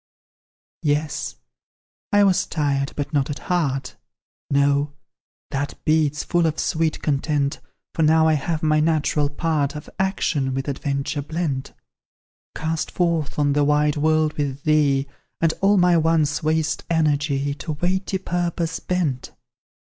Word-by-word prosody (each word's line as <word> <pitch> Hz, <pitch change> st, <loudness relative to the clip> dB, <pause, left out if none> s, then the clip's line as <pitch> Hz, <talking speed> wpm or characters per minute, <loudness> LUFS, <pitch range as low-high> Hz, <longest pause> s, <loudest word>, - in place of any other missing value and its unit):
Yes; 150 Hz, 0 st, -1 dB, 0.8 s
I 205 Hz, 0 st, +5 dB
was 190 Hz, -2 st, +3 dB
tired, 140 Hz, -3 st, 0 dB
but 145 Hz, +1 st, -4 dB
not 140 Hz, -1 st, +1 dB
at 145 Hz, -, -3 dB
heart; 140 Hz, -8 st, -2 dB, 0.5 s
No 140 Hz, +1 st, +2 dB, 0.6 s
that 140 Hz, +1 st, -3 dB
beats 155 Hz, -2 st, +2 dB
full 175 Hz, -1 st, +2 dB
of 160 Hz, -, -2 dB
sweet 160 Hz, -1 st, -1 dB
content, 145 Hz, -1 st, 0 dB, 0.3 s
For -, -, -1 dB
now 160 Hz, +1 st, +5 dB
I 160 Hz, -, +4 dB
have 155 Hz, +2 st, -1 dB
my 155 Hz, 0 st, +3 dB
natural 150 Hz, -2 st, +1 dB
part 150 Hz, -1 st, -1 dB
Of 150 Hz, -, -8 dB
action 155 Hz, -8 st, 0 dB
with 135 Hz, +1 st, -3 dB
adventure 140 Hz, +1 st, -2 dB
blent; 150 Hz, -3 st, -3 dB, 0.8 s
Cast 160 Hz, 0 st, -2 dB
forth 165 Hz, -5 st, -1 dB
on 145 Hz, -1 st, +2 dB
the 145 Hz, 0 st, +2 dB
wide 150 Hz, 0 st, +2 dB
world 155 Hz, 0 st, +2 dB
with 140 Hz, -1 st, -2 dB
thee, 145 Hz, -3 st, +3 dB, 0.3 s
And 165 Hz, -1 st, +2 dB
all 200 Hz, +1 st, +4 dB
my 180 Hz, -1 st, +5 dB
once 160 Hz, -2 st, +2 dB
waste 155 Hz, 0 st, 0 dB
energy 145 Hz, -3 st, +1 dB
To 155 Hz, +2 st, -5 dB
weighty 185 Hz, +5 st, -1 dB
purpose 175 Hz, -2 st, -2 dB
bent. 160 Hz, -9 st, -2 dB
150 Hz, 135 wpm, -22 LUFS, 145-165 Hz, 0.8 s, I